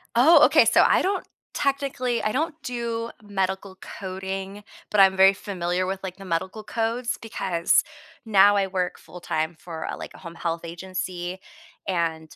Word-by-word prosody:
Oh, 300 +6 +7
okay - - +5
so, - - +5
I - - +4
don't 390 0 -1 0.3
technically, 275 -4 -1
I 215 - +1
don't 315 +7 -1
do 235 -1 -3
medical 190 -1 -2
coding, 190 +1 -6 0.3
but 210 - +2
I'm 190 -1 +7
very 195 +1 +7
familiar 185 -2 -2
with, 190 +1 -3
like, 185 -1 -6
the 195 - -11
medical 185 +5 -3
codes 230 +3 -2
because 185 -6 +1 0.4
now 205 -1 +6
I 195 -1 +2
work 185 -1 -2
full-time 165 -2 -4
for 165 -4 -6
a - - -4
like, - - -8
a - - -13
home 170 -1 -10
health 165 -1 -3
agency, 180 +1 -5 0.5
and 165 -3 -2
190 Hz, 160 wpm, -25 LUFS, 180-225 Hz, 0.5 s, Oh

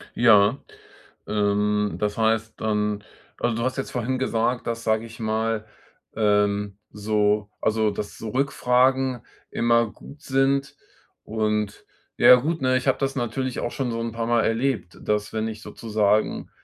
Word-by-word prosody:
Ja, 110 0 +5 0.7
ähm, 105 0 +1
das 105 +1 -1
heißt 110 0 +1
dann 105 -1 -1 0.4
also, 115 - +1
du 115 - -1
hast 130 +1 -1
jetzt 135 - -4
vorhin 125 +1 -2
gesagt, 120 -1 0
dass, 115 0 -3
sage 110 +1 +1
ich 115 0 -12
mal, 110 0 -1 0.5
ähm, 105 -2 +1
so 105 0 0
also, 110 0 +2
dass 100 0 -6
so 110 - -6
Rückfragen 130 -1 +1 0.3
immer 115 0 +2
gut 145 +1 -14
sind. 135 0 +1 0.5
Und 105 -1 -2 0.3
ja 125 - +9
gut, 155 +5 -1
ne, 130 0 +2
ich 130 - -4
habe 135 - +3
das 135 0 -1
natürlich 125 +1 -2
auch 120 - -2
schon 130 -4 -2
so 115 - -3
'n 115 0 -3
paar 115 0 -3
Mal 120 -1 +3
erlebt, 115 -6 -1
dass 105 0 -1
wenn 110 0 -1
ich 110 0 -7
sozusagen, 105 -1 0
115 Hz, 155 wpm, -24 LUFS, 105-125 Hz, 0.7 s, ja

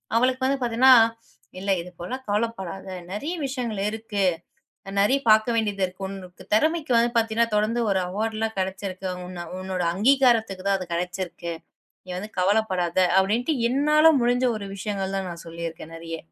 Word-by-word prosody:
அவளுக்கு 255 +2 +2
வந்து 275 +1 +1
பாத்தீன்னா, 240 +2 +4 0.7
இல்ல 195 +1 -1
இது 175 - -9
போலல்லாம் 255 +10 -6
கவலப்படாத. 205 -4 -2 0.3
நெறைய 290 - -3
விஷயங்கள் 250 -6 -3
இருக்கு. 220 -2 -3 0.8
நெறைய 260 +8 +3
பார்க்க 220 +2 +4
வேண்டியது 205 -3 -1
இருக்கு. 185 +1 -9
உனக்கு 185 -2 -10
தெறமைக்கு 315 +3 +1
வந்து 235 +1 +3
பாத்தீங்கன்னா 230 0 +2
தொடர்ந்து 215 +3 +1
ஒரு 195 - +2
அவார்ட்லாம் 220 +3 -2
கெடைச்சிருக்கு. 190 0 -3 0.2
உன்ன 175 -1 -7
உன்னோட 185 -1 -3
அங்கீகாரத்துக்குதான் 220 -4 +3
அது 185 - -6
கெடைச்சிருக்கு. 175 -1 -4 0.5
நீ - - -22
வந்து 210 +3 -7
கவலப்படாத. 185 -3 +1 0.2
அப்டின்னுட்டு 225 +10 +1 0.2
என்னால 300 +4 +5
முடிஞ்ச 245 +1 +2
ஒரு 200 -2 -6
விஷயங்கள் 195 -1 -3
தான் 190 -1 -4
நான் 170 -1 -9
சொல்லி 165 0 -7
இருக்கேன் 165 0 -11
நெறைய. 165 0 -6
210 Hz, 145 wpm, -24 LUFS, 185-235 Hz, 0.8 s, என்னால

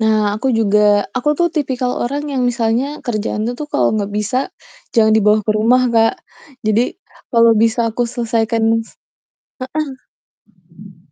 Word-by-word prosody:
Nah, 215 -1 +1
aku 260 +1 0
juga 210 -1 +3
aku 255 +3 -2
tuh 345 0 +3
tipikal 260 -5 -2
orang 280 +4 -2
yang 260 -2 -1
misalnya 245 +5 -1
kerjaan 215 -3 -2
tuh 245 - -3
tuh 300 - -6
kalau - - +3
nggak 205 -1 -2
bisa, 220 +5 -1 0.6
jangan 220 -1 +4
dibawa 210 0 +4
ke 215 - -1
rumah, 245 +4 +3
Kak. 225 -1 +3 0.5
Jadi, 215 +3 +3 0.5
kalau 230 -1 +5
bisa 230 +1 +2
aku 245 - -2
selesaikan 230 -1 -1 0.2
s - - -20 2.0
heeh. - - -29
230 Hz, 145 wpm, -17 LUFS, 215-250 Hz, 2.0 s, kalau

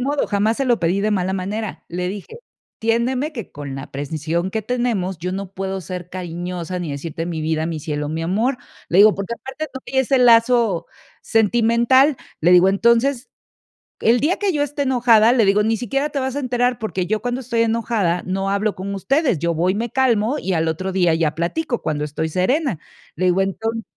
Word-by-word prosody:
modo, 280 +3 0
jamás 210 +2 +1
se 275 - -1
lo 240 -6 +2
pedí 175 +3 +1
de 210 +1 0
mala 190 -1 0
manera. 200 +3 -4
Le 180 +1 -3
dije: 205 - -7 0.4
"Entiéndeme 245 +6 0
que 230 -9 -7
con 145 -2 -7
la 135 - -8
precisión 155 +5 -2
que 220 - -2
tenemos, 220 -6 -1
yo 180 +3 -3
no 195 0 -5
puedo 190 0 -4
ser 180 0 -7
cariñosa 180 0 -5
ni 170 -4 -4
decirte 165 +4 -5
mi 165 -2 -4
vida, 160 0 -1
mi 165 -1 -3
cielo, 150 -1 -3
mi 160 +2 -3
amor". 220 +10 0 0.3
Le 175 - +2
digo 210 +1 +7
Porque 200 +4 -4
aparte 265 +5 -7
no 265 - -7
había 265 - +1
ese 265 +1 +2
lazo 230 -5 +4 0.4
sentimental, 235 +5 +3 0.2
le 170 - +3
digo: 180 +1 +6
"Entonces, 235 +6 +2 0.7
el 235 +2 +4
día 310 +8 +1
que 405 -2 +1
yo 295 -4 0
esté 290 0 -4
enojada", 240 -4 +4
le 240 -3 +3
digo: 200 +2 +3
"Ni 220 +1 +1
siquiera 275 +6 -1
te 290 - -5
vas 265 0 -2
a - - -1
enterar, 245 -2 0
porque 195 -4 -2
yo 215 +4 -1
cuando 245 +1 -2
estoy 235 -2 -1
enojada 225 -6 0
no 195 +1 -2
hablo 200 +1 0
con 200 +2 -5
ustedes, 265 - +1
yo 170 +2 -1
voy 180 +4 +1
me 230 +2 -3
calmo 250 -1 +1
y 190 - -2
al 165 -1 +1
otro 185 +4 -2
día 180 -3 +2
ya 160 -2 0
platico, 240 - -2
cuando 150 -1 -1
estoy 150 +2 -3
serena". 210 - 0 0.4
Le 185 - -1
digo 180 +1 +3
Entonces 225 +4 -2
205 Hz, 205 wpm, -20 LUFS, 180-245 Hz, 0.7 s, digo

